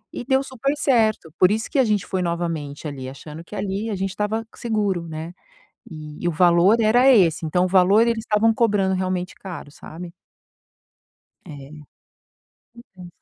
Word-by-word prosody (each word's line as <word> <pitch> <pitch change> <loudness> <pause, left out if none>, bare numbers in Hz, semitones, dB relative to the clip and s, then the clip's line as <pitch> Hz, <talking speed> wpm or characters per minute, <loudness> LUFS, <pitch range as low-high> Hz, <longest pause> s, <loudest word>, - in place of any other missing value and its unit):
E - - -5
deu 265 +1 +1
super 265 +1 -2
certo, 220 - +1
por 185 - +6
isso 220 +1 -1
que 290 - +1
a 265 - +5
gente 210 -4 0
foi 185 -1 -2
novamente 165 -4 -3
ali 130 -3 -6
achando 150 +4 -10
que 210 - -11
ali 205 +3 -3
a 205 - -2
gente 190 +1 -2
estava 210 +3 -2
seguro, 205 -7 -2
né, 160 +2 -7 0.5
e 155 +1 -7
o - - +1
valor 175 +6 +4
era 240 +4 +4
esse, 175 -8 +3
então 180 +3 +1
o - - 0
valor 190 +3 +4
eles 230 -1 0
estavam 220 0 +2
cobrando 205 -5 +1
realmente 185 -1 -3
caro, 180 -6 -9
sabe? 170 +4 -10 1.4
É, 140 -3 -11 1.0
compensa. 190 -7 -14
185 Hz, 165 wpm, -22 LUFS, 165-220 Hz, 1.4 s, por